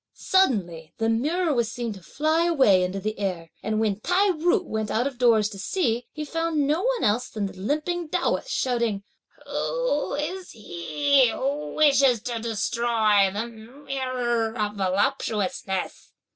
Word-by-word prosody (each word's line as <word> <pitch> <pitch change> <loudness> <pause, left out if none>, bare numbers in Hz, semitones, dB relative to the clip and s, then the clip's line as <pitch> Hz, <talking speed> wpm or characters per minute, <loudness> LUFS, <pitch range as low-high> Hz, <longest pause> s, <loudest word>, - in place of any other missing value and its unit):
Suddenly 185 - 0
the 225 0 0
mirror 305 +9 +1
was 235 -3 0
seen 235 -3 -4
to 190 - -12
fly 315 - 0
away 260 - +4
into 185 +2 -2
the 215 +1 -4
air; 180 -5 -3
and 215 0 -1
when 210 -2 0
Tai 375 - +2
ju 355 +4 +1
went 220 -8 -3
out 235 +3 0
of 270 -3 -4
doors 225 -4 +4
to 200 -2 -9
see, 240 - -1
he 305 -1 -5
found 330 -1 0
no 305 +5 +1
one - - 0
else 230 +4 +1
than 210 -2 -3
the 195 - -5
limping 305 - -2
Taoist, 360 +8 -1
shouting, 235 - 0 0.4
"Who - - -1
is 355 +6 -4
he 245 - +1
who 280 +6 -3
wishes 275 -5 +4
to 235 -1 -3
destroy 220 -2 +2
the 210 +4 -3
Mirror 240 -1 -3
of 210 -1 -1
Voluptuousness?" 200 -1 -2
240 Hz, 155 wpm, -25 LUFS, 210-300 Hz, 0.4 s, away